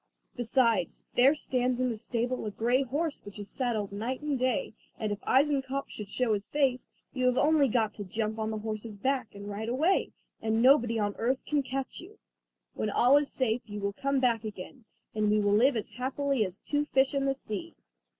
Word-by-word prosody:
Besides, 230 - +1
there 265 +5 +5
stands 250 -3 -1
in 255 0 +1
the 235 - -2
stable 240 +3 -2
a - - 0
grey 240 +5 +1
horse 285 +4 -2
which 205 0 -10
is 205 -1 -7
saddled 225 -6 -1
night 230 +6 -3
and 300 -1 -1
day; 255 -3 0 0.2
and 215 -2 -2
if 205 - -3
Eisenkopf 275 0 +1
should 210 -2 -7
show 235 +1 +1
his 205 -1 -2
face, 270 -4 0 0.2
you 255 -1 +1
have 250 0 +2
only 300 -2 +4
got 220 -3 +1
to 205 - -6
jump 215 +3 -3
on 220 0 -1
the 220 - -3
horse's 215 0 -5
back 255 0 -1
and 200 0 -8
ride 210 +2 -4
away, 315 +10 +2 0.3
and 220 0 +1
nobody 240 -2 +5
on 205 -1 0
earth 255 +4 0
can 295 -1 +1
catch 270 0 -4
you. 400 +5 -13 0.6
When 215 - -2
all 245 +6 +5
is 290 -1 0
safe 245 -2 0
you 205 0 -5
will 200 0 -2
come 275 +5 0
back 235 -3 +2
again, 215 +3 -8 0.3
and 215 -1 +1
we 210 0 +3
shall 205 -1 +2
live 245 +6 +4
as 215 - -2
happily 265 0 -1
as 185 0 -7
two 295 0 -1
fish 270 -1 +2
in 275 -1 0
the 270 0 +1
sea." 270 +7 -6
245 Hz, 210 wpm, -29 LUFS, 215-270 Hz, 0.6 s, there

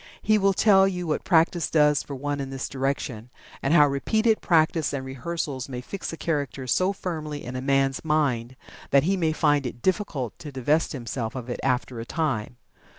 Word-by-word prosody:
He 215 0 +4
will 195 0 +3
tell 195 -2 +5
you 180 -2 -3
what 155 - -1
practice 165 -1 +2
does 150 -2 +4
for 140 - -7
one 145 +2 -3
in 135 -1 -4
this 135 -1 -4
direction, 130 -4 -3 0.3
and 135 - 0
how 155 -3 +7
repeated 220 +11 +1
practice 160 -3 +2
and 135 -2 -3
rehearsals 135 0 -4
may 125 -2 -5
fix 185 +10 -6
a 165 - -7
character 145 -5 -2
so 185 +9 +2
firmly 155 -6 -5
in 125 +1 -6
a 130 - -3
man's 135 0 +1
mind 135 -6 0 0.3
that 140 -1 +4
he 190 +5 +2
may 165 -4 +1
find 145 -4 +2
it 120 0 -9
difficult 165 - -1
to 150 - -8
divest 145 +6 +1
himself 120 -3 -4
of 125 -1 -5
it - - -4
after 125 -2 -1
a 115 - -5
time. 125 -7 -2
145 Hz, 195 wpm, -25 LUFS, 130-165 Hz, 0.3 s, how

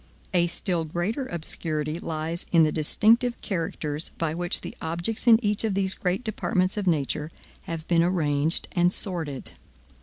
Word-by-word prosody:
A 175 -1 +4
still 175 -1 -1
greater 175 - -2
obscurity 155 -1 -1
lies 165 0 -4
in 165 -2 +6
the 155 - +3
distinctive 225 - +3
characters 160 -5 -2
by 165 -2 -1
which 175 +1 0
the - - -7
objects 170 +9 -2
in 230 -1 +9
each 205 +1 +1
of 215 -4 0
these 190 -1 +1
great 185 +6 -1
departments 185 -3 0
of 205 -3 -2
nature 150 -1 0 0.4
have 165 -1 -5
been 170 -1 +4
arranged 160 -3 +1
and 175 -2 +3
assorted. 165 -8 -3
170 Hz, 155 wpm, -26 LUFS, 160-190 Hz, 0.4 s, in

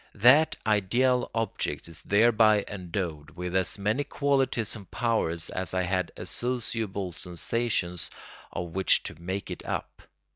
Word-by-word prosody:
That 125 +9 +6
ideal 120 +5 +2
object 115 -6 -2
is 85 -1 -7
thereby 110 0 +4
endowed 85 -5 -4
with 90 0 -4
as 95 +1 +2
many 105 +8 0
qualities 135 -6 0
and 100 -4 -11
powers 105 -8 0
as 95 -1 -3
I 90 - +2
had 90 -1 0
associable 110 -6 -3
sensations 90 0 -1 0.4
of 85 -1 -4
which 95 +3 +3
to 85 - -7
make 95 +3 -4
it - - -6
up. - - -4
100 Hz, 135 wpm, -28 LUFS, 90-115 Hz, 0.4 s, That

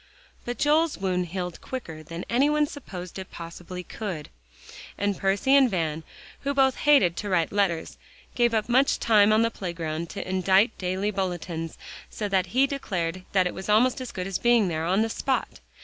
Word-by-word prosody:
But 245 0 -4
Joel's 310 +2 +2
wound 180 -2 -1
healed 180 0 -5
quicker 170 -12 -6
than 165 +2 -7
any 265 +5 +3
one 300 0 +3
supposed 190 - -8
it 190 - -8
possibly 175 +2 -8
could, 180 -7 -6 0.7
and 200 0 0
Percy 195 +9 +1
and 270 -3 +6
Van, 165 -5 -1 0.4
who 280 0 -2
both 265 -1 +3
hated 275 - +4
to 205 - -3
write 170 -4 +1
letters, 195 -5 -1 0.3
gave 240 -2 +2
up 215 -1 0
much 260 +3 +3
time 215 -2 +5
on 215 +1 +4
the 230 - +1
playground 170 -4 -4
to 200 - -6
indite 190 +4 +3
daily 185 +3 -1
bulletins, 175 -4 -4 0.3
so 210 - -4
that 190 -2 +1
he 260 +3 +3
declared 185 -10 -3
that 190 -2 +4
it 180 - -1
was 190 +2 -7
almost 245 +5 +3
as 255 - -6
good 180 - -4
as 195 0 -2
being 235 -5 +4
there 160 -1 -2
on 190 +5 +2
the - - 0
spot. 260 +3 -2
195 Hz, 185 wpm, -26 LUFS, 180-240 Hz, 0.7 s, and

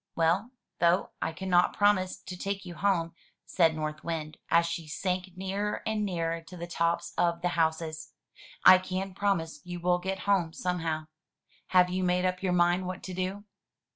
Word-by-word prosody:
"Well, 170 +7 +2 0.3
though 170 +2 +3
I - - -1
cannot 180 +1 +2
promise 205 -3 +3
to 180 - -8
take 195 +2 -4
you 175 - -7
home," 170 -3 0 0.3
said 165 -3 +3
North 155 0 -4
Wind, 160 -2 -4
as 170 0 +4
she 165 -1 -4
sank 185 +3 -3
nearer 195 +2 -2
and 220 -1 0
nearer 165 -4 -1
to 180 +2 -12
the 170 - -5
tops 170 0 -1
of 170 -1 +1
the 180 - +2
houses, 160 -1 -1 0.3
" - - -20
I 185 - +10
can 185 +1 -4
promise 170 -7 -1
you 175 0 -6
will 180 +1 +2
get 190 +1 -3
home 185 -5 +1
somehow. 165 -4 -2 0.6
Have 180 -1 +4
you 185 +1 -1
made 180 0 +2
up 185 0 -1
your 190 -2 0
mind 175 +1 +3
what 185 0 -5
to 185 - -6
do?" 185 +3 -3
180 Hz, 180 wpm, -29 LUFS, 165-185 Hz, 0.6 s, I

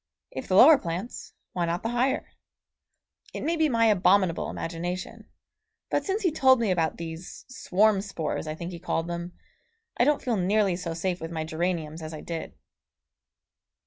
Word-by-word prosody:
If 130 - -6
the 185 - +1
lower 275 +8 +9
plants, 175 +8 -5 0.2
why 175 -1 0
not 170 +1 -2
the 225 - -1
higher? 255 +3 0 1.0
It - - -4
may 335 - +1
be 315 -2 +2
my 230 -3 +3
abominable 190 -4 +3
imagination, 175 +2 -5 0.6
but - - +1
since 405 +2 -2
he 360 - +3
told 265 -4 +5
me 225 -4 +1
about 165 -3 0
these 165 +1 -8
swarm 215 -4 +2
spores 170 -6 -4
I 155 - -3
think 170 +2 -6
he 170 - -7
called 165 -1 -2
them 175 +1 -5 0.6
I - - +4
don't 295 +2 +2
feel 240 -4 0
nearly 195 0 +2
so 170 -2 -4
safe 180 +1 -2
with 165 - -5
my 160 -1 -3
geraniums 160 -1 -2
as 155 0 -6
I 155 - -8
did. 165 -1 -6
180 Hz, 175 wpm, -27 LUFS, 165-230 Hz, 1.0 s, lower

